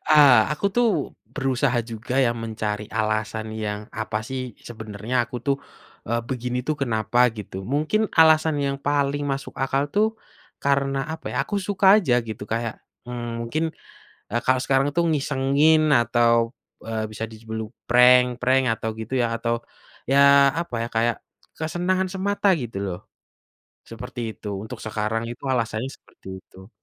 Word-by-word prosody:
Ah, 140 -7 +7
aku 150 - -1
tuh 240 -1 +4 0.5
berusaha 135 -2 +1
juga 115 +3 -4
ya 125 -3 +3
mencari 110 -2 -3
alasan 110 0 -2
yang 105 -1 -4
apa 110 -1 -3
sih 130 -3 -5
sebenernya 110 +1 -5
aku 120 +2 -7
tuh, 140 -1 +2 0.5
eee, 115 +1 +1
begini 125 -1 -2
tuh 155 - +1
kenapa 115 -1 0 0.2
gitu 95 -2 -7
mungkin 180 +9 +1
alasan 160 -1 +5
yang 140 -1 -1
paling 145 0 0
masuk 135 0 -5
akal 135 +1 +1
itu, 205 - +1 0.6
karena 140 -1 +1
apa 160 - -8
ya? - - -4
Aku 205 - -3
suka 195 0 0
aja 135 -11 +2
gitu 110 -1 -6
kayak, 115 0 -1 0.3
mmm, 120 -1 -5
mungkin, 130 +8 -2 0.8
kalau 130 0 +3
sekarang 135 +1 +2
tuh 170 - +3
ngisengin 150 +2 +3
atau, 120 0 +3 0.5
eee, 110 -1 -3
bisa 110 +1 -5
di 110 - -11
sebut 110 -1 -5 0.2
prank-prank 125 +1 +5
atau 115 - -4
gitu 110 +4 -5
ya - - +2
atau 115 0 0 0.6
ya 140 - +4 0.4
apa 170 -8 -6
ya 115 - -3
kayak 115 0 +2 0.4
kesenangan 180 +4 0
semata 200 +1 0
gitu 120 -4 -6
loh, 90 -3 -4 0.9
seperti 120 +2 -7 0.2
itu 105 - -8
untuk 115 +2 -8
sekarang 110 +1 -1
itu 120 - -9
alasannya 115 0 -1
seperti 115 - -16
itu. 95 +1 -16
125 Hz, 150 wpm, -23 LUFS, 110-140 Hz, 0.9 s, Ah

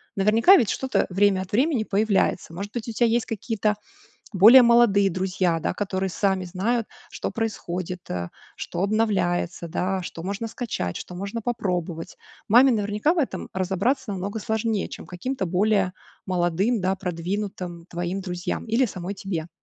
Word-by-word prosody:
Наверняка 225 - +6
ведь 230 - +2
что-то 265 0 0
время 195 0 +3
от 185 - -8
времени 260 +1 +2
появляется. 200 -4 +1
Может 200 +4 -6
быть, 240 -1 -4
у - - -2
тебя 235 +2 +2
есть 230 +1 +1
какие-то 220 -1 -1 0.6
более 225 +7 +9
молодые 235 -5 +5
друзья, 185 -2 0
да, - - -1
которые 190 -1 -2
сами 190 +1 0
знают, 210 +6 -1 0.2
что - - -4
происходит, 180 -5 -3
а 85 -1 -3 0.3
что - - -4
обновляется, 195 -5 0
да. 185 +3 -1
Что 165 -2 -7
можно 200 +5 -3
скачать, 215 - -4
что 180 - -7
можно 200 +5 -5
попробовать. 180 -7 -3 0.3
Маме 250 +5 +7
наверняка 210 +6 +1
в 355 - -2
этом 285 - -2
разобраться 200 +8 0
намного 200 +3 -4
сложнее, 220 -1 -1
чем - - -9
каким-то 200 +6 -3
более 190 +1 +2 0.3
молодым, 185 +5 +1
да, 190 +1 0
продвинутым 180 0 -4
твоим 175 +3 -3
друзьям 180 -2 -4
или 235 +3 +2
самой 185 -3 -5
тебе. 180 -4 -4
195 Hz, 155 wpm, -24 LUFS, 180-225 Hz, 0.6 s, более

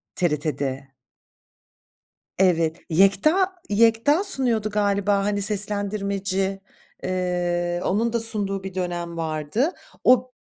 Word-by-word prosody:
TRT'de. 145 -5 -2 1.5
Evet, 165 -3 +2
Yekta 305 - +3
Yekta 230 - +3
sunuyordu 240 - +3
galiba 200 -1 +1
hani 205 -1 -1
seslendirmeci. 200 -1 -1 0.4
Eee, 175 -1 -1
onun 225 +4 0
da 235 - +1
sunduğu 200 -4 0
bir 190 -1 -7
dönem 175 -2 -4
vardı. 160 - -1 0.3
O 255 0 +4
195 Hz, 90 wpm, -23 LUFS, 175-215 Hz, 1.5 s, O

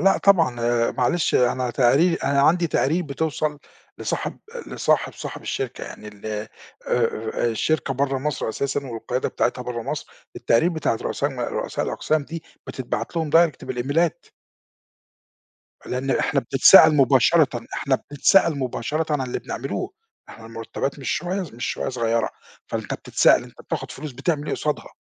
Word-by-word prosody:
لأ، 195 +3 +4
طبعًا 120 -11 +3
معلش 145 +7 0
أنا 125 0 +2
تقاري 140 +8 +4
أنا 140 -3 +1
عندي 170 +4 +4
تقارير 165 +2 +1
بتوصل 150 +1 -2 0.4
لصاحب - - -3 0.3
لصاحب - - 0
صاحب - - -7
الشركة 130 -2 -4
يعني 105 - -9
ال 105 0 -12
آآ 105 0 -4 0.4
آآ، 115 -1 0
الشركة 135 +5 0
بره 135 0 0
مصر 145 -4 -2
أساسًا 140 +4 -2
والقيادة 125 +1 -3
بتاعتها 125 +1 -1
بره 120 -2 -4
مصر، - - -4 0.3
التقارير 115 +9 +3
بتاعة 155 -8 -1
رؤساء - - -1
م - - -7
رؤساء - - -2
الأقسام 155 -2 -1
دي 165 +2 -7 0.2
بتتبعت 130 +6 -4
لهم 160 -2 -1
direct 165 -2 +3
بالإيميلات. 155 +7 -1 1.6
لأن 130 +2 -2
إحنا 140 - +1
بنتسأَل 150 +4 +7
مباشرةً 135 -1 +4
إحنا 135 -2 +1 0.2
بنتسأَل 155 +1 +4
مباشرةً 135 +5 -2
عن 145 - 0
اللي 125 - -3
بنعمله - - -4 0.4
إحنا 110 - -12
المرتبات 115 +5 -4
مش 135 - -4
شوية 185 +3 -1
ص 155 - -11
مش 120 - -4
شوية - - -2
صغيرة، 115 -2 0 0.4
فأنت - - -3
بتتسأَل - - +3
أنت - - -14
بتاخد - - -5
فلوس 150 +1 -7
بتعمل 145 +3 -2
إيه - - -1
قصادها؟ 150 -1 -3
135 Hz, 150 wpm, -23 LUFS, 120-155 Hz, 1.6 s, بنتسأَل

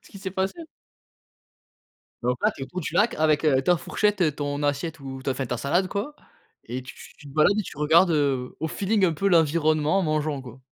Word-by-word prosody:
ce - - -19
qui 195 - -11
s'est 190 -1 -5
passé? 195 - -3 1.6
Donc 125 +1 0
là - - +4
tu 135 - -10
es - - -1
autour 180 +6 -6
du - - -5
lac 220 +3 +3
avec, 155 0 +2
heu, 135 -4 +3
ta 175 +3 +3
fourchette, 190 -6 0
ton 145 0 -3
assiette 145 +3 -1
ou 135 -1 -7
ta 135 - -1
enfin, 130 0 -2
ta 125 - -2
salade 150 +10 +1
quoi 225 +9 -4 0.5
et 130 +1 -3
tu 130 - -11 0.2
tu 145 - -15
te - - -12
balades 180 +8 +3
et 215 - +1
tu 150 - -10
regardes, 165 +4 +4
heu, 140 -5 0
au 160 - -1
feeling, 200 +3 +1
un 165 - +1
peu, 195 +6 -2
l'environnement 155 0 +3
en - - +1
mangeant, 155 -3 -1
quoi. 125 +1 -12
155 Hz, 225 wpm, -25 LUFS, 140-185 Hz, 1.6 s, là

